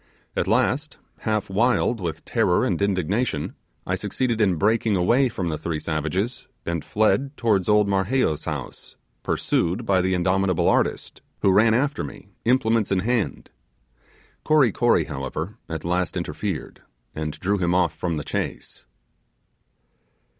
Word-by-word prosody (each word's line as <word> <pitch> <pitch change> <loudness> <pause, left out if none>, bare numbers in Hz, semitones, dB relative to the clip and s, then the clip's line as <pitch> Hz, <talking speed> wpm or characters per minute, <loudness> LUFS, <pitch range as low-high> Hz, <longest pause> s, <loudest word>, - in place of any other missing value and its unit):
At - - 0
last, 130 +7 +1 0.2
half 110 -2 -1
wild 115 +2 +1
with 80 -2 -4
terror - - +2
and - - -1
indignation, 100 -2 0 0.3
I - - -1
succeeded 120 -3 -1
in 95 -4 +3
breaking 110 +4 +2
away 120 +9 +3
from 95 -7 -3
the 75 -2 -3
three 80 0 -2
savages, 85 - -2 0.2
and 85 -2 -2
fled 135 +6 +1
towards 105 -5 +1
old 105 -1 +4
Marheyo's 95 - +1
house, 75 -5 -6 0.3
pursued 95 +8 0
by 95 -3 +3
the 95 +1 +1
indomitable 95 0 +1
artist, - - 0 0.2
who 95 - +5
ran 110 +3 +5
after 145 +4 0
me, 100 - -9 0.2
implements 115 -3 +2
in 95 -1 +2
hand. 115 0 -1 0.9
Kory 150 -7 +4
Kory, 120 +4 +3
however, 75 +6 -5
at 80 -1 -5
last 90 0 0
interfered - - -4 0.3
and 75 -1 -4
drew 100 +2 0
him 90 -1 +1
off 90 -3 +2
from 85 0 -2
the 75 - -3
chase. - - -5
95 Hz, 140 wpm, -24 LUFS, 85-115 Hz, 0.9 s, who